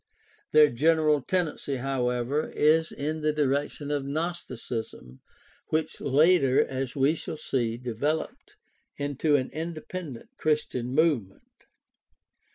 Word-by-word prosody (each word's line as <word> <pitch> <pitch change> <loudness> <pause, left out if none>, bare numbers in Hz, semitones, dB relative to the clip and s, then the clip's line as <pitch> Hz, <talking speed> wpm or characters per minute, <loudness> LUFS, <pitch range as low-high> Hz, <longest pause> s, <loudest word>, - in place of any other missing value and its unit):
Their 150 -1 +6
general 155 +2 +3
tendency, 160 -3 -1
however, 125 +1 -1
is 160 +2 +3
in 155 +2 -3
the 155 0 +2
direction 145 0 -1
of 145 -2 0
Gnosticism, 130 - -5 0.5
which 155 0 -2
later, 140 -1 +4
as 130 -1 -4
we 140 +2 +3
shall 160 -1 -6
see, 120 -6 -1
developed 125 +6 -3 0.4
into 145 +1 +1
an 130 -2 0
independent 160 -4 -6
Chris 155 -1 +1
tian 125 +1 -4
movement. 140 - -1
145 Hz, 110 wpm, -27 LUFS, 130-155 Hz, 0.5 s, Their